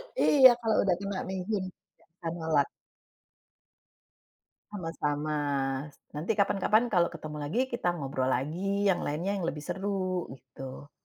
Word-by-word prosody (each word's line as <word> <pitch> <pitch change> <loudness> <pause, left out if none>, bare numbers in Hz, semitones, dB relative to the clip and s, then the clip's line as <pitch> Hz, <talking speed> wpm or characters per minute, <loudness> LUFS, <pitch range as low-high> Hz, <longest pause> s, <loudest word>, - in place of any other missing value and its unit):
Iya, 270 - +8
kalau 225 -2 +2
udah 185 -3 +3
kena 200 -1 -3
mihun. 190 +1 -2 0.6
Andalan. 160 -4 +1 2.0
Sama-sama. 155 -5 -2 0.8
Nanti 155 +8 -2
kapan-kapan, 215 +4 +2
kalau 175 -3 +4
ketemu 155 -2 -7
lagi, 150 +11 -2
kita 235 -7 -2
ngobrol 135 -3 -2
lagi, 180 +10 0
yang 195 -3 +3
lainnya, 165 +7 -2
yang 170 - -2
lebih 150 -2 -4
seru, 190 -1 -2
gitu. 130 +2 -10
175 Hz, 115 wpm, -29 LUFS, 150-200 Hz, 2.0 s, Iya